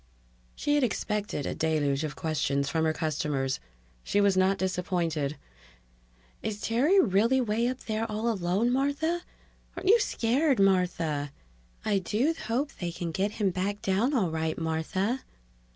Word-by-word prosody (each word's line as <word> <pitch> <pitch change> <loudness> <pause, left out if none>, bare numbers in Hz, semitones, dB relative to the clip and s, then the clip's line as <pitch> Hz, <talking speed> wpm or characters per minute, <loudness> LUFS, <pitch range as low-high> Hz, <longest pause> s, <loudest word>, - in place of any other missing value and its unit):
She 290 - 0
had 290 -2 +3
expected 210 - -1
a - - -2
deluge 150 -3 0
of 150 -1 -4
questions 140 -3 0
from 160 +2 0
her 160 - +3
customers. 150 -4 -1 0.4
She 205 - +1
was 200 -1 +4
not 190 +1 +3
disappointed. 175 -6 -1 1.0
"Is 210 -1 -3
Terry 270 - +3
really 230 - +3
way 235 -1 +1
up 255 +1 -3
there 220 0 -2
all 215 +2 -2
alone, 195 +4 +1
Martha?" 285 +6 0 0.6
"Aren't 380 - -1
you 460 +3 +7
scared, 265 - +1
Martha?" 175 -7 +1 0.5
"I 205 -2 +2
do 225 - +1
hope 265 +6 0
they 175 -2 -2
can 170 0 -4
get 195 +4 -1
him 205 -4 +1
back 195 +3 -2
down 215 +9 +1
all 190 -9 +1
right, 160 0 -1
Martha." 165 +9 -1
195 Hz, 150 wpm, -28 LUFS, 160-235 Hz, 1.0 s, you